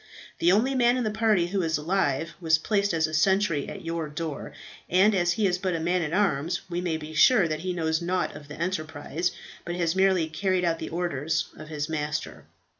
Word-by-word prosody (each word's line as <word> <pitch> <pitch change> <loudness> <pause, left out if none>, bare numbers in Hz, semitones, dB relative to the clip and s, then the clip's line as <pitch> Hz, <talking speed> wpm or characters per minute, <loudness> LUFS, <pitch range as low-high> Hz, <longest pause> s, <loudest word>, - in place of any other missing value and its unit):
The 175 - +4
only 230 +8 +3
man 245 -1 +3
in 250 - 0
the 215 - -1
party 215 -5 +2
who 195 +1 0
is 160 -2 0
alive, 165 -1 0
was 160 -1 +4
placed 200 +4 0
as 160 -2 +2
a 155 - -5
sentry 170 -2 +2
at 195 -4 -8
your 165 -2 -3
door, 155 0 -5 0.4
and 190 +4 +4
as 175 -2 +2
he 210 +2 0
is 180 -2 +1
but 185 -2 -1
a - - -2
man 175 +3 +1
at 160 -2 -2
arms, 175 -3 +1
we 175 +1 -1
may 170 -3 -1
be 155 0 -8
sure 195 +4 +5
that 155 -1 -2
he 185 +3 -3
knows 160 -2 0
nought 180 +1 -1
of 145 - -11
the 150 +1 -10
enterprise, 165 -1 -2 0.3
but 175 - -4
has 170 -1 0
merely 190 -3 +3
carried 185 +3 0
out 165 -1 0
the - - -5
orders 160 -2 -1
of 155 - -10
his 150 -1 -3
master." 150 -1 -4
170 Hz, 220 wpm, -26 LUFS, 160-190 Hz, 0.4 s, sure